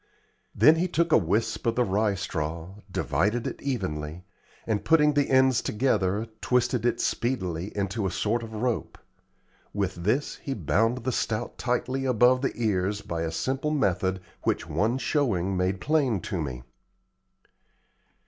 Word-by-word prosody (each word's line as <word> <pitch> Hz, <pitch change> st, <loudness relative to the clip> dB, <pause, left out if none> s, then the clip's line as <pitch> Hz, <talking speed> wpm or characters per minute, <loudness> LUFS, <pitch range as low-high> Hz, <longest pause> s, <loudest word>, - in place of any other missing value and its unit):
Then 155 Hz, +2 st, +6 dB
he 180 Hz, +3 st, +1 dB
took 170 Hz, -1 st, 0 dB
a -, -, +7 dB
wisp 105 Hz, +7 st, -1 dB
of 115 Hz, -, +2 dB
the 125 Hz, -, +3 dB
rye 105 Hz, 0 st, +1 dB
straw, 85 Hz, -2 st, -4 dB, 0.2 s
divided 105 Hz, +5 st, 0 dB
it -, -, -5 dB
evenly, 90 Hz, -, -3 dB, 0.4 s
and 110 Hz, -2 st, -1 dB
putting 150 Hz, -2 st, +4 dB
the 145 Hz, -1 st, +1 dB
ends 130 Hz, -1 st, +4 dB
together, 105 Hz, -3 st, 0 dB, 0.2 s
twisted 125 Hz, -1 st, +1 dB
it -, -, 0 dB
speedily 95 Hz, -7 st, -1 dB
into 100 Hz, +1 st, -1 dB
a -, -, -1 dB
sort 110 Hz, +6 st, 0 dB
of 115 Hz, -1 st, -8 dB
rope. 120 Hz, +1 st, -2 dB, 0.8 s
With 100 Hz, -2 st, 0 dB
this 105 Hz, +12 st, -1 dB
he 135 Hz, -, -4 dB
bound 115 Hz, -, +1 dB
the 130 Hz, -, 0 dB
stout 110 Hz, -2 st, -2 dB
tightly 130 Hz, +2 st, -1 dB
above 125 Hz, +1 st, +4 dB
the 135 Hz, -, -1 dB
ears 100 Hz, -3 st, 0 dB
by 85 Hz, -1 st, -3 dB
a 80 Hz, -1 st, -2 dB
simple 135 Hz, -, -1 dB
method 95 Hz, -, 0 dB, 0.2 s
which -, -, -1 dB
one 105 Hz, -, +1 dB
showing 105 Hz, -, 0 dB
made 95 Hz, +1 st, 0 dB
plain 135 Hz, -7 st, +1 dB
to 95 Hz, -6 st, -3 dB
me. 65 Hz, -4 st, -5 dB
110 Hz, 150 wpm, -27 LUFS, 95-130 Hz, 0.8 s, a